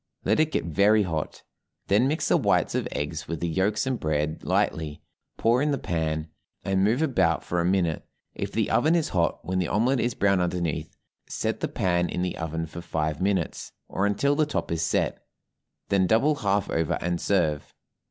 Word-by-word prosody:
Let -, -, +2 dB
it 155 Hz, 0 st, +2 dB
get -, -, -1 dB
very 100 Hz, +6 st, +4 dB
hot, 80 Hz, -5 st, -4 dB, 0.4 s
then 105 Hz, +6 st, +3 dB
mix 155 Hz, +4 st, 0 dB
the -, -, +5 dB
whites -, -, +2 dB
of -, -, -1 dB
eggs 80 Hz, +3 st, -4 dB
with 85 Hz, -2 st, -4 dB
the 85 Hz, -, -1 dB
yolks 95 Hz, -, 0 dB
and 130 Hz, -2 st, -1 dB
bread 75 Hz, 0 st, -1 dB
lightly, 75 Hz, -2 st, -1 dB, 0.3 s
pour 120 Hz, +3 st, +3 dB
in 150 Hz, -, +1 dB
the 140 Hz, -, +1 dB
pan, 80 Hz, -5 st, -2 dB, 0.3 s
and 95 Hz, -1 st, +1 dB
move 115 Hz, +9 st, +2 dB
about 95 Hz, -, +2 dB
for 90 Hz, 0 st, -1 dB
a -, -, 0 dB
minute; 90 Hz, -3 st, +1 dB, 0.3 s
if -, -, -4 dB
the -, -, 0 dB
oven 160 Hz, +3 st, +3 dB
is 165 Hz, -3 st, +1 dB
hot, 85 Hz, -2 st, 0 dB
when 95 Hz, +1 st, -1 dB
the 90 Hz, -, 0 dB
omelet 120 Hz, +6 st, +2 dB
is 120 Hz, -1 st, 0 dB
brown 100 Hz, -2 st, +2 dB
underneath, 85 Hz, -3 st, -2 dB, 0.3 s
set -, -, -2 dB
the -, -, -1 dB
pan 85 Hz, -1 st, 0 dB
in 90 Hz, -, -2 dB
the 90 Hz, -, -2 dB
oven 80 Hz, 0 st, -3 dB
for 80 Hz, +2 st, -8 dB
five 80 Hz, -1 st, -2 dB
minutes, 95 Hz, -3 st, -1 dB
or 100 Hz, -, 0 dB
until 140 Hz, +8 st, +1 dB
the 155 Hz, 0 st, +2 dB
top 150 Hz, -, -3 dB
is 80 Hz, -1 st, -1 dB
set; 80 Hz, -, 0 dB, 0.7 s
then 95 Hz, -2 st, +3 dB
double 115 Hz, +10 st, +3 dB
half 100 Hz, -7 st, 0 dB
over, 80 Hz, -2 st, 0 dB
and 85 Hz, 0 st, -2 dB
serve. 80 Hz, -7 st, 0 dB
90 Hz, 195 wpm, -26 LUFS, 80-110 Hz, 0.7 s, the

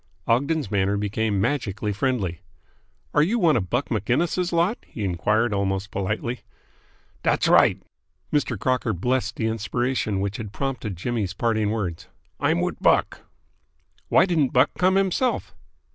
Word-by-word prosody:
Ogden's 140 Hz, 0 st, +1 dB
manner 100 Hz, 0 st, +1 dB
became 105 Hz, 0 st, -1 dB
magically 105 Hz, -4 st, -1 dB
friendly. 100 Hz, -7 st, -1 dB, 0.7 s
"Are 150 Hz, -, +4 dB
you 195 Hz, +10 st, +2 dB
one 170 Hz, -8 st, +4 dB
of 95 Hz, -6 st, -1 dB
Buck 125 Hz, +4 st, -1 dB
Maginnis' 155 Hz, -, 0 dB
lot?" 175 Hz, +6 st, +1 dB
he 110 Hz, -, -6 dB
enquired 105 Hz, +5 st, +1 dB
almost 100 Hz, 0 st, -1 dB
politely. 110 Hz, +5 st, -2 dB, 0.8 s
"Dat's -, -, +2 dB
right!" -, -, +5 dB, 0.5 s
Mr. 140 Hz, -6 st, +1 dB
Crocker 125 Hz, +1 st, 0 dB
blessed 120 Hz, +4 st, -1 dB
the 110 Hz, -, -2 dB
inspiration 110 Hz, 0 st, -1 dB
which 100 Hz, +1 st, -2 dB
had 105 Hz, -3 st, -6 dB
prompted 120 Hz, -6 st, -4 dB
Jimmy's 105 Hz, -1 st, -2 dB
parting 110 Hz, -1 st, +1 dB
words. 95 Hz, -7 st, -3 dB, 0.3 s
"I'm -, -, +2 dB
wit -, -, -3 dB
Buck." -, -, +2 dB, 0.9 s
"Why -, -, +5 dB
didn't 160 Hz, -8 st, +1 dB
Buck 130 Hz, -, +4 dB
come 185 Hz, +1 st, +3 dB
himself?" 195 Hz, +6 st, 0 dB
115 Hz, 140 wpm, -24 LUFS, 100-135 Hz, 0.9 s, right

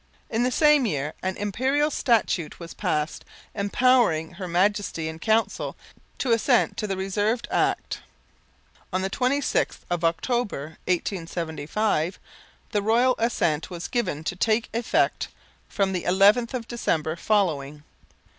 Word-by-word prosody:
In 225 Hz, -, +1 dB
the 250 Hz, -, +2 dB
same 300 Hz, -1 st, +4 dB
year 150 Hz, -4 st, -2 dB
an 185 Hz, 0 st, -2 dB
Imperial 265 Hz, +9 st, +1 dB
Statute 220 Hz, -, +1 dB
was 170 Hz, -1 st, -8 dB
passed 155 Hz, -6 st, -2 dB, 0.3 s
empowering 205 Hz, -6 st, +2 dB
Her 185 Hz, +1 st, -7 dB
Majesty 185 Hz, -2 st, 0 dB
in 160 Hz, 0 st, -6 dB
Council 220 Hz, +1 st, 0 dB, 0.4 s
to 255 Hz, -, -1 dB
assent 230 Hz, +2 st, +3 dB
to 210 Hz, -, -2 dB
the 195 Hz, -1 st, -2 dB
reserved 205 Hz, +5 st, -1 dB
Act. -, -, 0 dB, 0.9 s
On 185 Hz, 0 st, -1 dB
the 190 Hz, -, -2 dB
26th 265 Hz, +4 st, 0 dB
of 175 Hz, -1 st, -1 dB
October, 165 Hz, -, -1 dB
1875, 170 Hz, 0 st, -1 dB, 0.5 s
the 210 Hz, -, +1 dB
Royal 235 Hz, +5 st, +3 dB
assent 170 Hz, -9 st, 0 dB
was 175 Hz, -2 st, -5 dB
given 185 Hz, -, -2 dB
to 185 Hz, -, -2 dB
take 220 Hz, +4 st, +1 dB
effect 230 Hz, 0 st, +1 dB, 0.4 s
from 195 Hz, -2 st, 0 dB
the 180 Hz, -, -2 dB
11th 205 Hz, +7 st, +4 dB
of 235 Hz, -2 st, -4 dB
December 160 Hz, -9 st, -1 dB
following. 155 Hz, -8 st, 0 dB
200 Hz, 130 wpm, -25 LUFS, 165-235 Hz, 0.9 s, same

